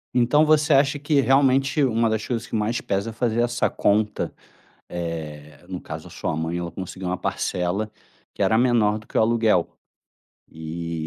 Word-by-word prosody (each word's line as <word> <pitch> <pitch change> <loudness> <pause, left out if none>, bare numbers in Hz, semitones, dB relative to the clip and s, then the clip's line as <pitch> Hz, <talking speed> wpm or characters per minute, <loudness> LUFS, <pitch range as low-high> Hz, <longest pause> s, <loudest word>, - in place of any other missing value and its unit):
Então 125 +6 +4
você 150 -1 +4
acha 140 +1 +3
que 145 0 +2
realmente 135 +2 +3
uma 115 -2 +2
das 110 -1 -1
coisas 115 -1 -3
que - - -16
mais 110 +3 0
pesa 100 +3 -2
é - - -8
fazer 120 0 0
essa 120 0 +1
conta. 105 +1 0 0.6
Eh, 75 -4 -6
no - - -5
caso - - -8
a - - -16
sua 75 - -3
mãe 80 +2 -2
ela 85 -1 -4
conseguiu 95 0 -6
uma 90 - -1
parcela 90 +4 -2 0.4
que - - -3
era 110 - +3
menor 115 -4 +3
do 110 - -15
que - - -7
o - - +5
aluguel. 110 -5 +2 0.8
E 80 +1 -6
110 Hz, 180 wpm, -23 LUFS, 90-125 Hz, 0.8 s, o